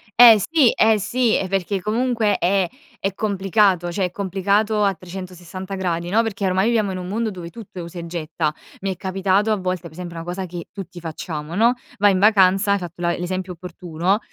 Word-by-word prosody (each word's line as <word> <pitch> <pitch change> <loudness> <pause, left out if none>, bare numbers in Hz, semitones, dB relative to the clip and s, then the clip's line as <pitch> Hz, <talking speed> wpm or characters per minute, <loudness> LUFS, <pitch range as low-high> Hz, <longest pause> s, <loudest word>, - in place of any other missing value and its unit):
Eh, 235 -2 +10
sì, 305 -7 +5
eh, 220 -1 +3
sì, 235 +3 +1
e 190 - -2
perché 195 0 -1
comunque 225 -1 +1
è 185 0 +1 0.3
è 195 0 -1
complicato, 195 -3 +2
cioè 190 +1 0
è 180 - -4
complicato 200 +3 +1
a 195 -1 +3
360° 185 0 -5
no, 225 - +4
perché 225 -3 -3
ormai 190 +3 +2
viviamo 215 -4 +1
in 185 - -4
un 180 - -6
mondo 220 +3 -1
dove 175 -3 -8
tutto 200 -3 -10
è - - -3
usa 170 +1 -9
e 170 - -6
getta. 160 -2 -2 0.3
Mi 195 0 -1
è - - -13
capitato 195 +3 +1
a 215 - +3
volte, 185 -2 -2
per 170 -3 -10
esempio 175 +1 -8
una 165 - -5
cosa 180 +2 -4
che 175 -1 -7
tutti 185 -3 -8
facciamo, 160 0 -5
no, 230 +3 +4 0.2
vai 205 0 +5
in 185 - +1
vacanza, 195 -1 +5
hai - - +2
fatto 175 -2 -8
la 170 0 0
l'esempio 185 +1 -3
opportuno, 175 +2 -2
190 Hz, 205 wpm, -21 LUFS, 175-205 Hz, 0.3 s, Eh